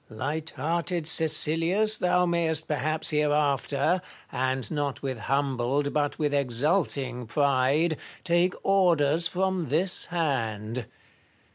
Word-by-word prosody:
Light 145 +8 -4
hearted 170 +4 -2
Caecilius, 165 +7 +2
thou 180 0 +2
mayest 165 -2 0
perhaps 155 +2 -1
hereafter, 150 +2 +1 0.3
and 130 0 -2
not 145 -3 -3
with 130 -3 -3
humbled 135 +2 -1
but 145 -1 0
with 150 -2 -1
exulting 135 - 0
pride, 140 +4 +1 0.3
take 175 +1 +2
orders 170 -5 +3
from 185 -2 -1
this 175 +5 +1
hand. 115 -8 -2
150 Hz, 105 wpm, -26 LUFS, 135-170 Hz, 0.3 s, orders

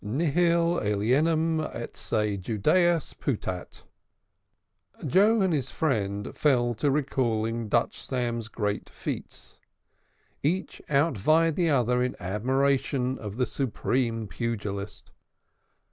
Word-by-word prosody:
Nihil 170 +8 +2
alienum 150 +11 +2
a 120 -6 -4
se 105 -2 -1
Judaeus 150 - +1
putat. 95 -8 -4 1.2
Joe 205 - +4
and 190 -3 +2
his 135 -4 0
friend 105 -9 -1
fell 120 -5 +2
to 145 +6 0
recalling 115 -5 0
Dutch 120 +3 +1
Sam's 120 -3 -2
great 105 -1 -3
feats. - - -7 0.8
Each 175 +7 -1
out 140 -4 +2
vied 160 +7 +3
the 175 -3 +2
other 125 -3 +2
in 125 - -1
admiration 130 +6 0
for 105 - -6
the 120 +6 -1
supreme 120 -3 -1
pugilist. 100 0 -4
125 Hz, 105 wpm, -27 LUFS, 110-155 Hz, 1.2 s, Joe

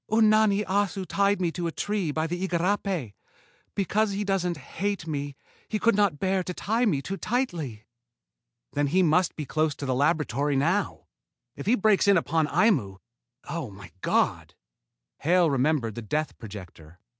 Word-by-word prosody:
Unani 215 -2 +4
Assu 195 -1 0
tied 200 0 +2
me 175 -3 0
to 175 0 -3
a - - -2
tree 205 -1 -2
by 155 +2 -1
the 175 +3 -2
igarapé. 180 - -1 0.6
Because 205 +2 +1
he 200 +1 -1
doesn't... 185 -4 0
hate 195 +6 -3
me, 145 -3 -4 0.3
he 215 - 0
could 230 +2 +3
not 200 -7 +2
bear 190 +3 +1
to 180 0 -5
tie 230 +4 0
me 145 -9 0
too 195 +7 -4
tightly." 170 - -2 0.9
"Then 145 0 +1
he 185 +6 +3
must 175 +2 +2
be 150 - -4
close 155 +1 0
to 140 - -6
the 130 - 0
laboratory 145 0 +1
now. 170 +9 0 0.5
If - - -8
he 235 - +5
breaks 205 -3 +3
in 200 -2 +6
upon 160 -1 +1
Aimu 150 - +2 0.5
oh, 165 -7 -4
my 95 -3 -12
God!" - - 0 0.6
Hale 170 0 +3
remembered 135 -4 +1
the 120 - -6
death 150 +8 -2
projector. 90 -6 -10
170 Hz, 165 wpm, -26 LUFS, 145-200 Hz, 0.9 s, in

